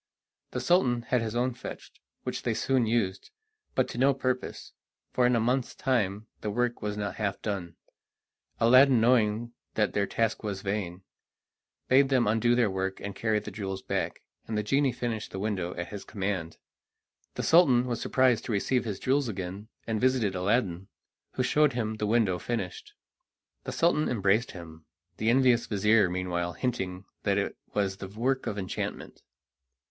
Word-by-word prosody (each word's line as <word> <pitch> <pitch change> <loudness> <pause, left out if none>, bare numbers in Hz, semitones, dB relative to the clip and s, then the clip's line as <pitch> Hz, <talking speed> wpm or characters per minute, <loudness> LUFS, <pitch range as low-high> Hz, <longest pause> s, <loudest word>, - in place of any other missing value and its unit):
The - - -3
Sultan 125 -10 +2
had 125 0 +1
his 110 0 -3
own 125 +1 +1
fetched, 120 - -9 0.2
which - - -3
they - - -1
soon 130 -4 +1
used, 110 -5 -1 0.5
but 130 - +2
to 120 - -5
no 135 +1 +4
purpose, 130 -1 -3 0.4
for 125 -1 +4
in 125 - +3
a - - +3
month's 125 +3 0
time 110 -5 0
the 105 - -3
work 120 +3 -1
was 105 0 -3
not 105 -1 -3
half 100 -3 -2
done. 95 -6 -3 0.8
Aladdin, 130 +2 +6
knowing 115 -1 +2 0.2
that 105 -4 +1
their 100 -1 +1
task 115 -1 0
was 100 -3 -4
vain, 95 -3 -3 0.8
bade 135 +1 +5
them 130 -3 +3
undo 115 +3 +3
their 120 -5 +2
work 95 0 -2
and 100 -1 -6
carry 110 0 +1
the 105 - -5
jewels 95 -2 -5
back, - - -2 0.2
and 110 - -2
the 105 - 0
genie 135 +5 +2
finished 115 -3 -3
the - - -7
window 95 -3 -2
at 85 0 -5
his 100 -1 -7
command. 95 -5 -3 0.8
The - - -3
Sultan 135 -8 +5
was 120 -2 -3
surprised 130 -3 +3
to - - -3
receive 120 +4 +1
his 105 -4 -3
jewels 135 +3 +1
again 95 +1 -5 0.2
and 110 -2 -2
visited 125 -6 +2
Aladdin, 95 -1 0 0.5
who 130 - 0
showed 150 +2 +3
him 110 -2 -2
the 105 - -1
window 105 -5 +2
finished. 420 - -4 0.7
The - - -3
Sultan 165 -2 +2
embraced 110 +1 +2
him, 80 -3 -11 0.3
the 110 - +1
envious 125 -1 +4
vizir 105 -1 +3
meanwhile 90 -1 -2
hinting 95 -4 -3 0.2
that - - +1
it - - -1 0.2
was 100 -2 0
the 95 - -6
work 125 +7 -1
of 105 - -2
enchantment. 95 -2 -5
110 Hz, 170 wpm, -28 LUFS, 100-125 Hz, 0.8 s, Aladdin